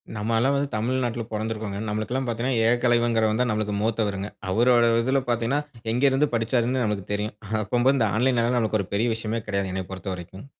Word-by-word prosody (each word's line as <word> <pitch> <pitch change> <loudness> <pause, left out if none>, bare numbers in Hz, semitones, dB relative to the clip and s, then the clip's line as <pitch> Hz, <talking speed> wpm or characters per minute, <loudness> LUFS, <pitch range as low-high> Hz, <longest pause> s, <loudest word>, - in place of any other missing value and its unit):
நம்ம 110 +2 -2
எல்லாம் 135 +4 +2
வந்து 140 0 0
தமிழ்நாட்டில 120 +1 -1
பொறந்திருக்கோம்ங்க. 110 -2 -3
நம்மளுக்குலாம் 115 +5 -2
பாத்தீங்கனா 120 +1 0
ஏகலைவன்ங்கிறவன்தான் 120 -1 +2
நம்மளுக்கு 105 -1 -1
மூத்தவருங்க. 105 -3 -1 0.2
அவரோட 120 +2 +4
இதில 130 +3 +1
பாத்தீங்கனா 120 +4 +1 0.3
எங்கேருந்து 135 +3 +3
படிச்சாருன்னு 120 +2 +1
நம்மளுக்கு 105 -2 -2
தெரியும். 105 +1 -3 0.3
அப்பம்போது 125 +6 +2
இந்த 110 -3 +2
ஆன்லைன்‌னால 120 -1 +2
நம்மளுக்கு 110 -2 +1
ஒரு 95 - -9
பெரிய 115 +4 +1
விஷயமே 115 0 -3
கிடையாதுங்க, 100 -2 -1
என்னைய 95 -1 -3
பொறுத்தவரைக்கும். 95 +2 -7
115 Hz, 155 wpm, -25 LUFS, 105-125 Hz, 0.3 s, அவரோட